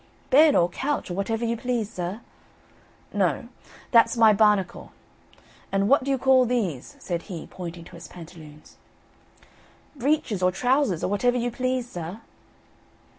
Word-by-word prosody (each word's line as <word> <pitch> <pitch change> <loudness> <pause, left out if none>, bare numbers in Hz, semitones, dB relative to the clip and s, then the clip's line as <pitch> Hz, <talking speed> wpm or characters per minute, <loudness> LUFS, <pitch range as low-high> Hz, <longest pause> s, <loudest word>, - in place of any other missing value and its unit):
"Bed 300 +2 +6
or 170 - +4
couch, 270 +4 -3
or - - -2
whatever 225 +5 -2
you 230 0 0
please, 235 -3 -3
sir." 185 +5 -5 0.9
"No, - - 0 0.4
that's 230 0 +5
my 220 -2 +6
'barnacle.' 210 -2 +1 0.8
And 195 0 +1
what 275 +3 +4
do 275 - -4
you 270 - +2
call 260 0 +4
these?" 205 - -2
said 175 -2 -4
he 170 -4 -6
pointing 175 -2 -8
to - - -14
his 170 - -10
pantaloons. 160 -3 -13 1.2
"Breeches 270 -7 0
or 180 0 +3
trousers, 250 - +1
or - - +1
whatever 245 +6 +1
you 245 0 -1
please, 255 0 -2
sir." 175 +4 -6
215 Hz, 145 wpm, -25 LUFS, 180-250 Hz, 1.2 s, Bed